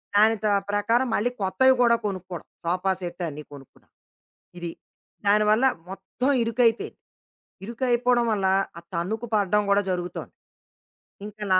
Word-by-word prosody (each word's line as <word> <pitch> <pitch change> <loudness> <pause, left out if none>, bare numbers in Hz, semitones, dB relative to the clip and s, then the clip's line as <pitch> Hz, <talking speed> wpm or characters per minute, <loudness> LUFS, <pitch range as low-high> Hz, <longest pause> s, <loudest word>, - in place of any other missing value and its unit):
దానితో 215 0 +4 0.2
ప్రకారం 230 +5 +1
మళ్ళీ 230 +4 +1
కొత్తవి 260 +8 +4
కూడా 235 -1 +5
కొనుక్కోవడం, 185 -4 -5 0.2
సోఫా 180 +3 0
సెటన్ని 175 -4 -5
కొనుక్కున్నా. 135 -2 -15 0.7
ఇది. 170 -1 -4 0.6
దానివల్ల 210 +4 +4 0.2
మొత్తం 195 +7 -3
ఇరుకైపోయింది. 230 0 +1 0.7
ఇరుకైపోవడం 240 +1 +1
వల్ల, 195 -3 +1 0.3
ఆ - - -8
తన్నుకు 210 +7 -2
పడడం 205 0 +2
కూడా 200 0 +4
జరుగుతోంది. 175 0 -5 0.9
ఇంకా 210 0 -8
నా 185 - +6
205 Hz, 115 wpm, -25 LUFS, 185-235 Hz, 0.9 s, నా